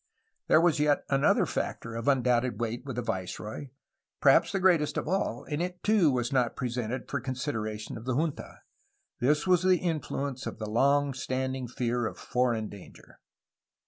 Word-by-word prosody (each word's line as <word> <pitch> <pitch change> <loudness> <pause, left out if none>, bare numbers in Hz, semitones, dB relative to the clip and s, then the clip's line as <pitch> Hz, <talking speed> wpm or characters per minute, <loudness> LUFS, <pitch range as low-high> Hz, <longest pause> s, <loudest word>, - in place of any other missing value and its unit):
There - - +6
was 165 -3 +3
yet 150 -1 +2
another 135 0 +3
factor 115 - -4
of 115 +2 -5
undoubted 125 -3 +2
weight 120 +2 -3
with 135 -4 -5
the 125 - -2
viceroy, 95 +8 -4 0.3
— - - -58
^perhaps - - +5
the 195 - 0
greatest 165 -6 +3
of - - -2
all, 190 +4 -1
— - - -13
^and 150 +2 -1
it 180 0 -4
too 210 -7 +4
was 125 0 -1
not 125 -3 +1
presented 125 -1 -3
for 140 - -3
consideration 115 -6 -4
of 115 - -12
the 130 -1 -1
junta. 155 +1 -3 0.6
This 150 +4 +2
was 180 -2 +4
the 185 0 +4
influence 145 -6 -3
of - - -5
the 110 - -5
long 140 +5 +2
standing 130 0 -3
fear 120 -1 -1
of - - -7
foreign 120 -3 0
danger. 100 -3 -14
130 Hz, 175 wpm, -29 LUFS, 120-150 Hz, 0.6 s, There